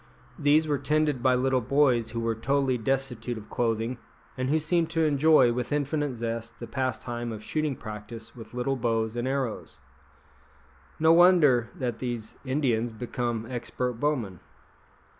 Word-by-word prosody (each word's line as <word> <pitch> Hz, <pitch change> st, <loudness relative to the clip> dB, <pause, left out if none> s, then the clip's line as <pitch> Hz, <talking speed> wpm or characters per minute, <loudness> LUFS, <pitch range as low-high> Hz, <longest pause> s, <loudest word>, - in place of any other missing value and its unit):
These 150 Hz, +2 st, +4 dB
were 145 Hz, -2 st, 0 dB
tended 150 Hz, -1 st, +1 dB
by 130 Hz, 0 st, +4 dB
little 130 Hz, 0 st, +1 dB
boys 125 Hz, -3 st, +2 dB
who 115 Hz, 0 st, -3 dB
were 115 Hz, 0 st, 0 dB
totally 135 Hz, +3 st, +1 dB
destitute 125 Hz, -1 st, -2 dB
of 105 Hz, 0 st, -11 dB
clothing, 115 Hz, +1 st, -1 dB, 0.4 s
and 130 Hz, 0 st, -2 dB
who 155 Hz, -, +3 dB
seemed 165 Hz, +1 st, +1 dB
to 165 Hz, -1 st, +1 dB
enjoy 145 Hz, -4 st, +5 dB
with 125 Hz, +2 st, -3 dB
infinite 145 Hz, -1 st, -1 dB
zest 115 Hz, 0 st, -4 dB
the 120 Hz, -, -7 dB
pastime 120 Hz, -1 st, -3 dB
of 110 Hz, -1 st, -7 dB
shooting 155 Hz, 0 st, -1 dB
practice 110 Hz, +1 st, -9 dB
with 120 Hz, 0 st, -11 dB
little 125 Hz, +2 st, 0 dB
bows 115 Hz, -2 st, -1 dB
and 120 Hz, +1 st, -2 dB
arrows. 130 Hz, -4 st, -3 dB, 1.2 s
No 160 Hz, +1 st, +5 dB
wonder 160 Hz, -10 st, +5 dB
that 120 Hz, -3 st, -3 dB
these 120 Hz, -4 st, -5 dB
Indians 130 Hz, -4 st, 0 dB
become 120 Hz, 0 st, -3 dB
expert 125 Hz, -1 st, -3 dB
bowmen. 120 Hz, -, -1 dB
125 Hz, 150 wpm, -27 LUFS, 115-140 Hz, 1.2 s, enjoy